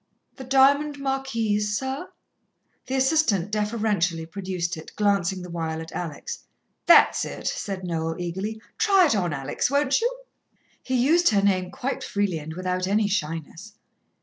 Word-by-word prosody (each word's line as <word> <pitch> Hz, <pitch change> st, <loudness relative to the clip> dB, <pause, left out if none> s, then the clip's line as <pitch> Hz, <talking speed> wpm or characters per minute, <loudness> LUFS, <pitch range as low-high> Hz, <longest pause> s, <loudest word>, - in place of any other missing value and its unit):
"The 265 Hz, -, -7 dB
diamond 280 Hz, +3 st, +3 dB
marquise, 230 Hz, -7 st, -1 dB
sir?" 265 Hz, -, -4 dB, 0.8 s
The 265 Hz, -, -2 dB
assistant 265 Hz, -, +2 dB
deferentially 210 Hz, -6 st, 0 dB
produced 180 Hz, 0 st, -3 dB
it, 160 Hz, 0 st, -10 dB
glancing 195 Hz, -3 st, +1 dB
the 180 Hz, -, -8 dB
while 160 Hz, -1 st, -3 dB
at 160 Hz, 0 st, -8 dB
Alex. 165 Hz, -5 st, -5 dB, 0.5 s
"That's -, -, +6 dB
it," -, -, -7 dB
said 195 Hz, -2 st, -3 dB
Noel 165 Hz, -2 st, -2 dB
eagerly. 190 Hz, +5 st, -4 dB, 0.2 s
"Try 395 Hz, -4 st, +5 dB
it 285 Hz, -, +2 dB
on, 180 Hz, -4 st, 0 dB
Alex, 135 Hz, -, -1 dB
won't 280 Hz, -, +2 dB
you?" 480 Hz, +2 st, +1 dB, 0.7 s
He 260 Hz, -, -2 dB
used 315 Hz, +8 st, +4 dB
her 200 Hz, -3 st, +2 dB
name 185 Hz, -2 st, +2 dB
quite 265 Hz, +1 st, -4 dB
freely 200 Hz, -5 st, -1 dB
and 160 Hz, +1 st, -8 dB
without 185 Hz, 0 st, -2 dB
any 210 Hz, +1 st, +2 dB
shyness. 165 Hz, +2 st, -4 dB
205 Hz, 150 wpm, -25 LUFS, 175-265 Hz, 0.8 s, That's